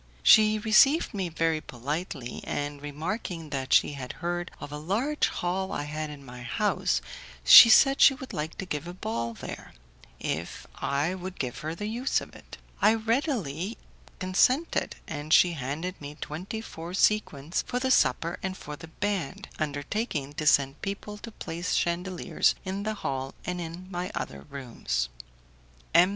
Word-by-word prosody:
She 215 0 +7
received 235 +9 +4
me 190 -4 -2
very 165 -1 0
politely, 140 0 -5
and 145 0 -3
remarking 160 +2 -4
that 135 -2 -3
she - - +5
had 130 -3 -6
heard 175 0 -3
of - - -8
a 150 - -5
large 230 - 0
hall 190 +2 -2
I 145 - -2
had 155 +1 -4
in 145 -2 -10
my 125 -1 -10
house, 165 - 0 0.4
she 230 - +11
said 270 +4 +6
she 270 - +8
would 260 0 -9
like 155 +2 -4
to 195 - -4
give 150 -2 -4
a 175 - -7
ball 115 -7 -3
there, - - -8 0.5
if 85 +2 -4
I 145 +5 0
would 185 0 -7
give 125 -1 -3
her 155 +3 -4
the 210 - -5
use 235 +5 0
of - - -11
it. - - -12 0.2
I 215 +2 +6
readily 225 - -1 0.4
consented, 250 - +2
and 150 0 -6
she 175 +2 +7
handed 160 +5 -4
me 145 +1 -7
twenty 185 +8 -5
four 170 -4 -7
sequins 170 -7 +1
for 250 - -2
the 260 +1 0
supper 170 -8 +2
and 190 -1 -3
for 150 - -7
the 160 - -11
band, 190 -3 -3
undertaking 145 - -2
to 150 +1 -3
send 140 -2 +3
people 205 +1 -5
to 230 - -8
place 170 -3 -3
chandeliers 180 +1 +1
in 190 +1 -3
the 215 +1 -2
hall 135 -7 -4
and 180 0 -3
in 170 +2 -7
my 180 0 -3
other 70 0 -5
rooms. 120 - -3 0.8
M. 175 +3 +7
170 Hz, 165 wpm, -28 LUFS, 145-205 Hz, 0.8 s, she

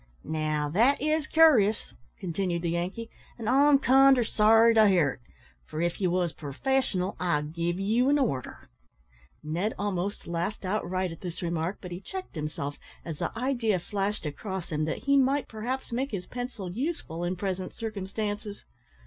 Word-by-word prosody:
"Now, 155 -1 -1
that 235 - +3
is 310 +1 0
cur'ous," 255 -11 +4 0.2
continued 175 0 -2
the 170 - 0
Yankee; 185 +7 -3 0.3
"an' 225 -3 -5
I'm 280 +3 +6
kinder 270 -1 +5
sorry 225 +1 +5
to 220 -1 +6
hear't, 165 -10 +2 0.4
for 155 - -7
if 170 +3 -1
ye 185 - +3
was 175 -2 0
purfessional 185 - -1
I'd 155 -4 0
give 170 +2 -1
ye 210 +4 +1
an 290 - +4
order." 180 - -2 0.8
Ned 175 +8 -2
almost 200 -1 -2
laughed 175 +4 -3
outright 185 -2 -1
at 165 - -10
this 180 -1 -6
remark, 170 +2 -2
but 180 - -8
he 175 - -5
checked 375 - -7
himself 150 -2 -4 0.3
as 160 -3 -6
the - - -1
idea 240 -5 +1
flashed 200 +2 -3
across 190 +4 -5
him 155 0 0
that 160 - -4
he 280 +1 +4
might 275 +1 +2
perhaps 245 +4 -4
make 260 +4 -1
his 195 -6 -4
pencil 245 -7 -5
useful 225 - -3
in 175 +1 -1
present 185 0 -4
circumstances. 205 0 -4
195 Hz, 160 wpm, -28 LUFS, 170-235 Hz, 0.8 s, I'm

